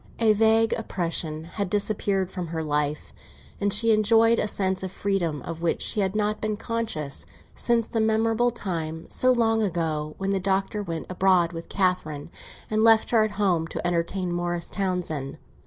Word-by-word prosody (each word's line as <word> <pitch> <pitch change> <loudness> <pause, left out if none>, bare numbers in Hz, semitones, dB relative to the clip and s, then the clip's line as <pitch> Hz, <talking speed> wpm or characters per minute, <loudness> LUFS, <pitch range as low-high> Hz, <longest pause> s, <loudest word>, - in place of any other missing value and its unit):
A 220 -2 +4
vague 225 +1 +3
oppression 165 -6 -3
had 185 +3 -4
disappeared 200 -2 0
from 180 -3 -4
her 160 0 -3
life, 150 0 -2 0.5
and 200 0 +1
she 225 +3 +4
enjoyed 225 +2 +4
a - - 0
sense 190 -2 0
of 190 -1 -5
freedom 185 -7 -1
of 165 0 -6
which 170 - 0
she - - 0
had 195 0 0
not 210 0 0
been 215 -1 -1
conscious 220 - -3 0.3
since 235 -2 +1
the 225 - -1
memorable 225 +2 +2
time, 165 -8 -4
so 255 - +3
long 225 -2 +2
ago, 160 -6 -2
when 195 0 -2
the 195 - +1
Doctor 195 +2 -1
went 165 -5 -5
abroad 185 -2 +2
with 165 0 -8
Catherine 175 -6 -1 0.4
and 215 0 +1
left 225 -1 +5
her 225 -2 +5
at 215 - -1
home 180 -6 +1
to - - -5
entertain 175 +1 -1
Morris 175 -1 -3
Townsend. 180 -8 -2
190 Hz, 170 wpm, -25 LUFS, 170-215 Hz, 0.5 s, left